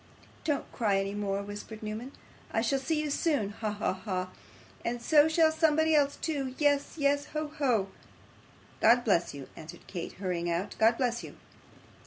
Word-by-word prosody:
'Don't 295 -4 -1
cry 210 -5 +1
any 195 +1 -2
more,' 200 -1 -2
whispered 205 +2 -8
Newman. 220 +5 -5 0.4
'I 225 - +2
shall 270 +3 +1
see 305 +4 0
you 300 - -2
soon. 285 -9 +1
Ha! 215 +1 -3
ha! 205 -2 -1
ha! 185 -1 -3 0.5
And 240 +1 -2
so 295 +5 +5
shall 320 0 +4
somebody 315 0 +3
else 285 -2 +3
too. 275 -5 -3
Yes, 285 -1 +2
yes. 285 -1 +2
Ho! 305 0 -2
ho!' 230 -9 +2 0.9
'God 240 +2 +5
bless 175 -8 +2
you,' 140 -2 -8
answered 155 0 -11
Kate, 175 -3 -6
hurrying 180 -3 -2
out, 170 +4 -2
'God 225 +1 +5
bless 240 -2 0
you. - - -9
235 Hz, 170 wpm, -30 LUFS, 200-290 Hz, 0.9 s, so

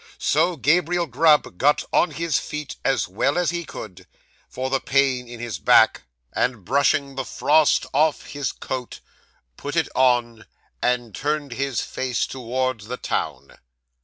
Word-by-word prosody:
So, 170 +4 +2
Gabriel 170 +4 +2
Grub 150 - +2
got 145 +2 +3
on 180 - +4
his 160 -1 -1
feet 150 -1 -6
as 135 - +1
well 115 - 0
as 180 -1 +1
he 175 0 -3
could, 90 - -10 0.4
for 130 +1 -4
the 135 - +2
pain 130 -3 +1
in 120 -1 -9
his 115 -6 -5
back; - - +4 0.3
and, 120 -6 -1
brushing 140 +3 +2
the 135 0 -3
frost 150 +3 +2
off 155 -1 +2
his 145 -5 -3
coat, 130 -2 -6 0.6
put - - -5
it - - +1
on, 120 -3 +1 0.3
and 120 -3 0
turned 150 +1 -2
his 135 0 -2
face 125 -5 -2
towards 130 -3 -3
the 125 +2 -4
town. - - -4
135 Hz, 150 wpm, -23 LUFS, 120-150 Hz, 0.6 s, on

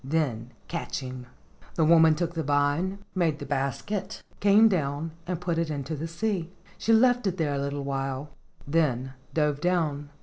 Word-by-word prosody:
Then 130 -5 -1 0.2
catch 170 - -3
him." 130 -1 -7 0.5
The 160 - +3
woman 160 -1 +6
took 170 +1 -2
the 165 - -2
vine, 145 +7 0
made 165 -5 +1
the - - -7
basket, 140 - -3 0.2
came 205 +2 +6
down 155 -4 -1 0.2
and 180 -2 -2
put 175 -2 -1
it 165 -1 0
in 145 -2 -3
the 155 +3 -4
sea. 175 0 -2 0.3
She 225 - +1
left 245 0 +4
it 185 -1 -1
there 155 -4 0
a 140 - -1
little 140 0 -3
while, 135 +1 -3 0.4
then 135 -4 +1 0.2
dove 150 -2 +1
down. 160 -5 0
155 Hz, 170 wpm, -27 LUFS, 140-175 Hz, 0.5 s, woman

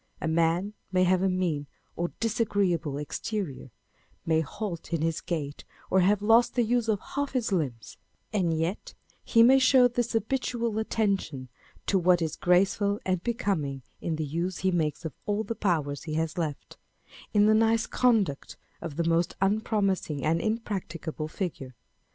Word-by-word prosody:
A - - -2
man 170 +5 +1 0.2
may 185 -1 +3
have 185 0 +3
a 190 - +2
mean 170 -6 -1 0.3
or 175 - -1
disagreeable 200 -10 0
exterior, 150 -1 -4 0.6
may 160 -1 +3
halt 170 +3 -5
in 160 -2 0
his 165 -1 -1
gait, 150 -4 -4 0.3
or 190 - +5
have 200 +2 +3
lost 225 +3 +4
the 245 - +3
use 235 0 +1
of 215 -3 +1
half 285 -1 -2
his 245 -5 0
limbs; 130 - -2 0.4
and 185 -5 +1
yet 165 +5 -2 0.3
he 230 -1 +5
may 265 +3 +7
show 255 -1 +6
this 240 0 -2
habitual 230 -1 -1
attention 195 - -1 0.4
to 195 - +2
what 180 0 +4
is 160 -2 -2
graceful 195 +3 +2
and 185 -2 0
becoming 170 - -1 0.2
in 165 - -1
the 155 0 -2
use 170 +5 -2
he 190 - +4
makes 160 -1 -1
of 160 - -4
all 210 +1 0
the 220 - -3
power 165 -10 0
he 155 -2 -4
has 160 0 -1
left, 155 -5 -4
â€" - - -32 0.2
in 205 0 +6
the 215 - +5
"nice 225 +1 +3
conduct" 215 - +1 0.2
of 165 -4 -6
the 170 +1 0
most 165 +1 +1
unpromising 195 - 0
and 165 +2 +2
imprac 215 -3 -2
ticable 160 -1 -5
figure. 145 -9 -5
185 Hz, 170 wpm, -28 LUFS, 160-215 Hz, 0.6 s, may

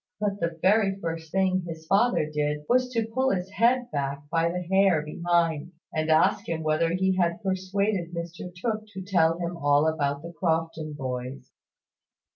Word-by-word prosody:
But 205 -1 -1
the 170 -1 -2
very 195 0 +3
first 165 -2 -5
thing 190 -1 +2
his 160 -1 -7
father 200 0 +3
did 150 0 -1
was 255 +1 +3
to 230 -3 0
pull 260 +4 0
his 190 -2 -2
head 240 +4 +2
back 140 -1 -2
by 165 0 +2
the 180 +1 -3
hair 190 -3 +3
behind, 170 +1 0 0.2
and 155 0 -1
ask 160 0 +3
him 160 -1 -2
whether 155 +2 +2
he 190 +1 +1
had 175 +2 0
persuaded 190 -1 -1
Mr 170 +1 -6
Tooke 215 +3 -3
to 190 0 -6
tell 165 -4 +2
him 175 0 -3
all 145 0 +3
about 145 -2 -1
the 170 +1 -8
Crofton 165 -2 -1
boys. 130 -1 -5
170 Hz, 170 wpm, -26 LUFS, 160-195 Hz, 0.2 s, very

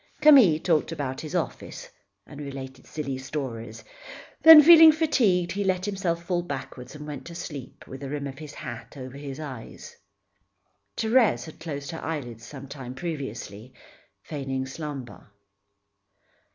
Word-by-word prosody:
Camille 255 - +7
talked 160 -2 +1
about 140 -5 -4
his 155 - -6
office, - - -4 0.4
and 145 0 -10
related 135 -2 -8
silly 140 -4 -4
stories; 120 -5 -6 0.6
then, 320 -1 +11
feeling 325 0 +10
fatigued, 235 - +2
he 200 +1 -2
let 185 -1 0
himself 185 -4 -2
fall 175 0 -1
backward 135 -4 -7
and 150 0 -9
went 145 -3 -7
to 170 - -9
sleep 145 -7 -8
with 135 - -9
the 140 0 -6
rim 145 0 -4
of 135 0 -7
his 150 -2 -9
hat 125 0 -8
over 130 0 -8
his 140 -1 -7
eyes. 130 -7 -9 1.0
Thérèse 220 - +3
had 160 - -12
closed 145 -2 -6
her 165 - -7
eyelids 120 -8 -5
some 140 -2 -10
time 130 -2 -8
previously, 130 - -6 0.5
feigning 135 -3 -4
slumber. 135 -5 -8
145 Hz, 145 wpm, -26 LUFS, 130-175 Hz, 1.0 s, then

